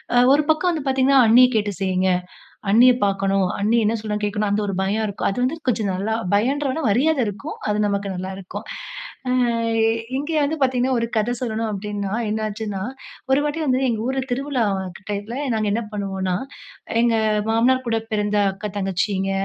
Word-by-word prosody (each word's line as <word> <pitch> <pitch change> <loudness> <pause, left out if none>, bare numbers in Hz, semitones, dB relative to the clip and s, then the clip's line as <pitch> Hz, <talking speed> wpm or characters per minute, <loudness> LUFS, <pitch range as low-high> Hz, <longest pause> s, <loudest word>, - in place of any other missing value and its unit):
அ - - +5 0.2
ஒரு 295 +2 +3
பக்கம் 355 +3 +1
வந்து 310 -4 -4
பார்த்தீங்கன்னா, 265 +1 +4
அண்ணிய 245 +3 +7
கேட்டு 205 -1 -1
செய்ங்க, 185 0 +1 0.6
அண்ணிய 245 +4 +7
பார்க்கணும், 195 -1 +1
அண்ணி 220 +4 +2
என்ன 225 +2 +1
சொல்றாங்க 210 -1 -2
கேட்கணும் 205 0 -1
அந்த 210 +1 +1
ஒரு 195 - -2
பயம் 210 +3 0
இருக்கும். 200 - -2
அது 195 - -4
வந்து 290 +6 -1
கொஞ்சம் 215 -5 +1
நல்லா 200 +4 -1 0.2
பயம்ன்றத 270 +7 +1
விட 320 - -3
மரியாத 285 +8 +2
இருக்கும். 220 +10 -6
அது 210 0 +1
நமக்கு 200 0 -1
நல்லாருக்கும். 190 0 -6 0.6
அ - - +2 0.8
இங்கே 295 +4 -2
வந்து 305 +3 -1
பார்த்தீங்கன்னா, 255 -1 +2
ஒரு 230 - 0
கத 215 +2 0
சொல்லணும் 225 -2 -2
அப்படின்னா 200 -1 -4 0.2
என்னாச்சுன்னா, 215 -2 -3 0.5
ஒரு 265 +2 +4
வாட்டி 295 +2 -2
வந்து 260 -1 +2
எங்க 225 -3 -1
ஊர்ல 265 +1 0
திருவிழா 265 -1 0 0.4
டயத்துல 205 +3 -4 0.2
நாங்க 215 -1 0
என்ன 225 - 0
பண்ணுவோம்னா, 190 -2 -2 0.7
எங்க 235 -1 +3 0.3
மாமனார் 250 +3 +3
கூட 225 -1 +1
பிறந்த 210 0 0 0.2
அக்கா, 205 +2 -6
தங்கச்சிங்க, 195 0 -1
220 Hz, 165 wpm, -22 LUFS, 200-255 Hz, 0.8 s, அண்ணிய